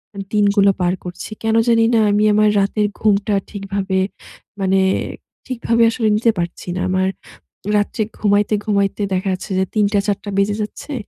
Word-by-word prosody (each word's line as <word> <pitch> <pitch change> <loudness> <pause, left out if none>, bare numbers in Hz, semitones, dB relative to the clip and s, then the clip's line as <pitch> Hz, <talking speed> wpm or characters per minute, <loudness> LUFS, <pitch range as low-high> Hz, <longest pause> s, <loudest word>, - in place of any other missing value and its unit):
আ - - -10 0.2
দিনগুলো 200 -1 +4
পার 180 0 +2
করছি। 180 +3 -8
কেন 225 0 +1
জানিনা, 230 0 +4
আমি 210 +1 +2
আমার 210 0 +4
রাতের 205 +1 +1
ঘুমটা 205 -1 +2
ঠিকভাবে 195 -1 -2 0.6
মানে 190 0 +2 0.7
ঠিকভাবে 235 -2 +1
আসলে 225 -2 -1
নিতে 230 +1 +3
পারছি 170 +1 -5
না। 185 - -2
আমার 185 0 +1 0.7
রাত্রে 205 +2 -1 0.2
ঘুমাইতে, 205 0 +2
ঘুমাইতে 200 -1 0
দেখা 190 +1 -1
যাচ্ছে, 185 - -6
যে - - +3
০৩:০০ 205 -1 +2
০৪:০০ 205 0 -2
বেজে 200 +1 +2
যাচ্ছে। 285 +7 -8
205 Hz, 150 wpm, -19 LUFS, 195-215 Hz, 0.7 s, দিনগুলো